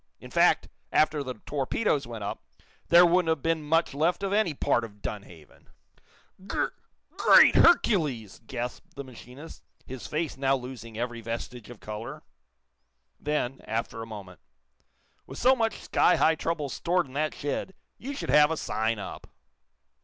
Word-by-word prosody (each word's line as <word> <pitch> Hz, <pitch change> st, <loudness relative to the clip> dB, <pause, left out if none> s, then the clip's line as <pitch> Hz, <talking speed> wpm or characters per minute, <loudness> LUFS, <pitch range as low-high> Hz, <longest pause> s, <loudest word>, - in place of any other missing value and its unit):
In -, -, -12 dB
fact, -, -, +3 dB, 0.2 s
after 155 Hz, -1 st, +2 dB
the 130 Hz, -2 st, -5 dB
torpedoes 145 Hz, -, -1 dB
went 115 Hz, -3 st, -7 dB
up, 100 Hz, -, -5 dB, 0.4 s
there 175 Hz, +1 st, +8 dB
wouldn't 175 Hz, -1 st, +3 dB
have 160 Hz, -4 st, 0 dB
been 165 Hz, -1 st, +1 dB
much 165 Hz, 0 st, +1 dB
left 165 Hz, +7 st, 0 dB
of 195 Hz, 0 st, -1 dB
any 205 Hz, -7 st, +1 dB
part 120 Hz, -, +1 dB
of 105 Hz, -2 st, -10 dB
Dunhaven!" 90 Hz, -7 st, -9 dB, 0.8 s
"Gr -, -, 0 dB, 0.5 s
great -, -, +7 dB
Hercules!" 150 Hz, -, +3 dB
gasped 125 Hz, -1 st, -6 dB
the 140 Hz, -, -6 dB
machinist, 130 Hz, +4 st, -12 dB, 0.2 s
his 130 Hz, -1 st, -8 dB
face 155 Hz, -3 st, -3 dB
now 135 Hz, 0 st, +2 dB
losing 125 Hz, -3 st, -8 dB
every 120 Hz, 0 st, -3 dB
vestige 115 Hz, 0 st, -6 dB
of 120 Hz, -4 st, -11 dB
color. 115 Hz, +8 st, -7 dB, 1.0 s
Then, 145 Hz, -3 st, -2 dB
after 115 Hz, 0 st, -3 dB
a 115 Hz, -, -7 dB
moment: 100 Hz, -5 st, -10 dB, 0.9 s
"With 135 Hz, -, -9 dB
so 260 Hz, +3 st, +5 dB
much 225 Hz, -4 st, -1 dB
sky 180 Hz, -, +3 dB
high 160 Hz, -, +4 dB
trouble 160 Hz, -2 st, -2 dB
stored 175 Hz, +6 st, 0 dB
in 130 Hz, -, -15 dB
that 155 Hz, +2 st, -1 dB
shed, 145 Hz, +6 st, -4 dB, 0.2 s
you 280 Hz, +3 st, -6 dB
should 280 Hz, -, -3 dB
have 150 Hz, 0 st, +6 dB
a 160 Hz, -, -2 dB
sign 110 Hz, -3 st, -1 dB
up." 105 Hz, -, -8 dB
140 Hz, 155 wpm, -27 LUFS, 115-165 Hz, 1.0 s, there